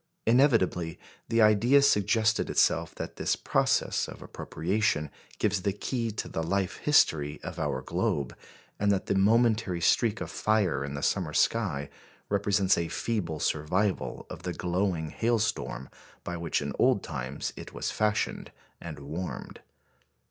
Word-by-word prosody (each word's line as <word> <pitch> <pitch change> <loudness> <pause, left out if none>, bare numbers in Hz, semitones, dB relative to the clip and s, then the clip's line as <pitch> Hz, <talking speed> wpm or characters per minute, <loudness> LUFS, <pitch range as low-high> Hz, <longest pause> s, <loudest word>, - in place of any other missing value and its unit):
Inevitably 115 - +3 0.3
the 115 -1 +4
idea 110 +6 +5
suggested 110 -1 +2
itself - - +2
that - - -6
this - - +1
process - - +1
of - - -10
appropriation 85 -4 -1 0.3
gives 100 -2 0
the 100 +1 0
key 115 +3 -2
to 110 - -4
the 80 - -3
life 95 +3 -1
history 75 - +2
of 90 -1 -6
our 70 -4 -2
globe, 70 -4 -1 0.4
and 105 0 +3
that 100 -1 0
the - - 0
momentary 110 -2 +3
streak 110 +5 +2
of - - -5
fire 100 -10 +1
in 70 0 -5
the 70 - -5
summer 85 -6 0
sky 85 -12 +1 0.4
represents 100 -2 +2
a 85 - -1
feeble 85 -7 -2
survival 90 +8 -1
of - - -9
the 90 0 -4
glowing 90 -2 -1
hailstorm 110 - -1 0.4
by 85 - -4
which 85 -1 -1
in - - -4
old - - +3
times 65 +3 -4
it - - -9
was - - -3
fashioned 105 0 -1 0.3
and 80 -3 -7
warmed. 80 +6 -6
95 Hz, 145 wpm, -28 LUFS, 80-110 Hz, 0.4 s, idea